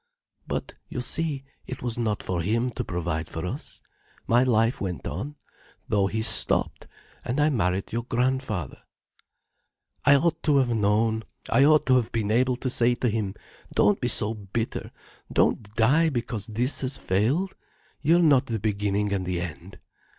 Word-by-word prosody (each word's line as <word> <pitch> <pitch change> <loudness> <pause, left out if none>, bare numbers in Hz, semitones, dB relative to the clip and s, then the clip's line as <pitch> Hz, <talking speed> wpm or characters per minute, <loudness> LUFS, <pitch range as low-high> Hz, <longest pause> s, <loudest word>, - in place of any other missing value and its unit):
"But - - -4 0.2
you - - -4
see, 145 +1 -1 0.2
it 130 - -7
was 120 -2 -1
not 110 -3 -1
for 90 -2 -2
him 115 +7 0
to - - -4
provide 80 -2 -3
for 80 +1 -5
us. 90 - -6 0.4
My 120 +1 +4
life 115 -1 +2
went 90 -4 -4
on, 120 - -5 0.5
though 100 -2 +2
his 110 +2 -1
stopped, - - +2 0.4
and 125 +5 -2
I 150 +1 +3
married 95 -6 -1
your 120 - 0
grandfather. 125 - -1 1.2
"I 140 - +6
ought 165 +3 +1
to 150 -3 +3
have 130 -3 +3
known, 110 0 +1 0.3
I 135 - +5
ought 155 0 +5
to 130 -1 +5
have 120 -3 -1
been 110 -2 -1
able 125 +2 +2
to 130 +1 -3
say 120 0 +3
to 120 - 0
him: 105 -3 -2 0.4
'Don't - - +3
be - - +1
so 105 +2 +1
bitter, 110 +2 -4 0.4
don't - - +2
die 145 +9 +4
because 115 -6 -3
this 120 +5 +1
has 130 0 -2
failed. 130 - 0 0.5
You 160 +4 +4
are - - +4
not 140 -4 +4
the 115 - -1
beginning 105 -1 -1
and 95 -2 -1
the 90 -1 -2
end. 90 +2 -7
115 Hz, 170 wpm, -26 LUFS, 100-130 Hz, 1.2 s, I